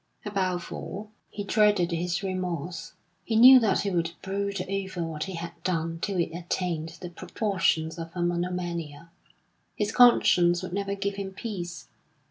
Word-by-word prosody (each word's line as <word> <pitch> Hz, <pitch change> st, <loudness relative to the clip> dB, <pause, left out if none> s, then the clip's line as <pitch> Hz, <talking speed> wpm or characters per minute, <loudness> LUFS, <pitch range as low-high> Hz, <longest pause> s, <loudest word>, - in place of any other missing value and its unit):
Above 185 Hz, -4 st, -2 dB
all, 210 Hz, +2 st, -7 dB, 0.2 s
he 205 Hz, -, -5 dB
dreaded 205 Hz, -4 st, +3 dB
his 175 Hz, +2 st, -1 dB
remorse. 180 Hz, -3 st, -4 dB, 0.3 s
He 225 Hz, -, -2 dB
knew 255 Hz, +3 st, +10 dB
that 215 Hz, -5 st, +2 dB
he 200 Hz, -, -1 dB
would 170 Hz, -2 st, 0 dB
brood 200 Hz, 0 st, -2 dB
over 190 Hz, -2 st, -3 dB
what 160 Hz, -2 st, -4 dB
he 190 Hz, -1 st, -6 dB
had 170 Hz, 0 st, -5 dB
done 165 Hz, -2 st, -1 dB
till 200 Hz, 0 st, -2 dB
it 165 Hz, -1 st, -1 dB
attained 170 Hz, -2 st, -3 dB
the 180 Hz, -1 st, -6 dB
proportions 175 Hz, -4 st, -1 dB
of 165 Hz, 0 st, -5 dB
a 175 Hz, -, -1 dB
monomania; 170 Hz, -3 st, -3 dB, 0.6 s
his 210 Hz, 0 st, -1 dB
conscience 180 Hz, -8 st, +5 dB
would 185 Hz, -, -6 dB
never 200 Hz, 0 st, -2 dB
give 200 Hz, 0 st, -3 dB
him 195 Hz, -1 st, -4 dB
peace. 190 Hz, -4 st, -6 dB
180 Hz, 155 wpm, -27 LUFS, 170-200 Hz, 0.6 s, knew